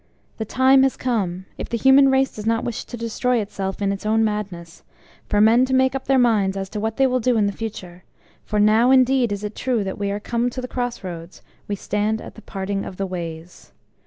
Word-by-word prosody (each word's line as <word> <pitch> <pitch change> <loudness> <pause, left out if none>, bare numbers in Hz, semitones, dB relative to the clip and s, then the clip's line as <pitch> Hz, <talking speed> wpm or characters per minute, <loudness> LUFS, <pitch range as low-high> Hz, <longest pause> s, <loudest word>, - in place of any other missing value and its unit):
The 220 - -2
time 260 +4 +4
has 270 -1 +2
come 190 -7 -2
if - - -5
the 235 - -1
human 265 +3 +6
race 265 0 +2
does 215 0 -6
not 225 0 +1
wish 235 -3 -4
to 240 - -8
destroy 235 +2 -1
itself 200 -1 -4
in 195 - +1
its 200 - -5
own 220 +1 +2
madness 195 -6 -4 0.5
for 205 - +1
men 225 +4 +5
to 260 0 0
make 260 0 +3
up 270 -1 -4
their 270 0 +3
minds 210 -6 +2
as 195 -1 -4
to 210 - -5
what 220 +1 -3
they 270 - +4
will 255 -1 +1
do 245 0 +1
in 210 - +3
the 200 - 0
future; 185 -5 -7 0.4
for 210 - -2
now 215 +4 +4
indeed 260 -2 +4
is 205 0 -4
it 210 0 -4
true 245 -5 -1
that 190 0 -5
we 200 -1 -1
are 200 +1 -2
come 235 +3 -1
to 250 - -7
the 250 - -4
cross 245 -3 -4
roads, 170 -1 -8 0.2
we 205 - -2
stand 210 +2 -1
at - - -10
the 220 - -13
Parting 195 -1 -4
of 185 - -8
the 195 - -2
Ways. 170 -2 -8
220 Hz, 240 wpm, -22 LUFS, 195-250 Hz, 0.5 s, human